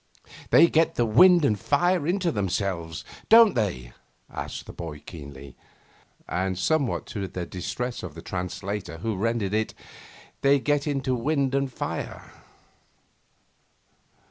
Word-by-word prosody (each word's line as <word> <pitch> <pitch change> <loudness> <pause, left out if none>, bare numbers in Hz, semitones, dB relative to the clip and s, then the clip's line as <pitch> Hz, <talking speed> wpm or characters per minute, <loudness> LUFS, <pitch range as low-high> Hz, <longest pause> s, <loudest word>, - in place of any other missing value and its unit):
'They - - +7
get 165 0 +2
the 120 - +2
wind 170 +9 +6
and 105 -6 +1
fire 175 - +1
into 180 -1 +1
themselves, 95 -5 -2 0.2
don't 225 -1 +8
they?' 85 - -2 0.4
asked - - -6
the - - -10
boy 80 -3 -7
keenly, 70 -4 -10 0.7
and 95 0 -1
somewhat 140 - 0
to 100 -3 -4
the 90 -1 -5
distress 120 +8 -4
of 85 -5 -8
the 80 - -8
translator 90 0 -4
who 110 +5 -2
rendered 105 0 -1
it, 110 0 -1 0.7
'They 140 0 +4
get 145 +2 0
into 135 -2 0
wind 135 +2 0
and 140 -1 0
fire. - - -5
110 Hz, 130 wpm, -26 LUFS, 90-140 Hz, 0.7 s, don't